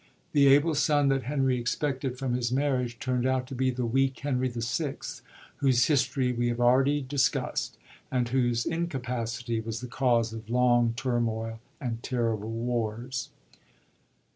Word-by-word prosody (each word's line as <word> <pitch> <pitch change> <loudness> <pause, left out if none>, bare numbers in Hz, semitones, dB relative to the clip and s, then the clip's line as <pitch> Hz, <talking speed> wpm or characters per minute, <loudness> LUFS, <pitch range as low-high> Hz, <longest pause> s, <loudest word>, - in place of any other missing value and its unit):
The 140 -1 +5
able 145 +4 +5
son 145 -1 +3
that 135 -2 0
Henry 135 -2 +1
expected 130 +1 -2
from 130 -1 -2
his 120 -1 -1
marriage 130 -3 0
turnd 125 0 0
out 130 -1 +1
to 135 - -9
be 130 0 +1
the 125 -1 -2
weak 135 +3 +1
Henry 130 -3 0
VI., 120 +5 -2 0.6
whose 130 -3 +3
history 130 -3 +1
we 120 0 0
have 120 0 -1
already 135 +4 +4
discus 130 -1 0
t, - - -26 0.3
and 125 -2 0
whose 120 -2 +1
incapacity 125 -8 -2
was 115 0 -4
the 125 - -6
cause 120 -3 +1
of 110 0 -8
long 120 -1 +3
turmoil 115 -3 -1 0.2
and 115 -4 -4
terrible 115 -4 -1
wars. 120 +2 -3
125 Hz, 150 wpm, -28 LUFS, 120-135 Hz, 0.6 s, The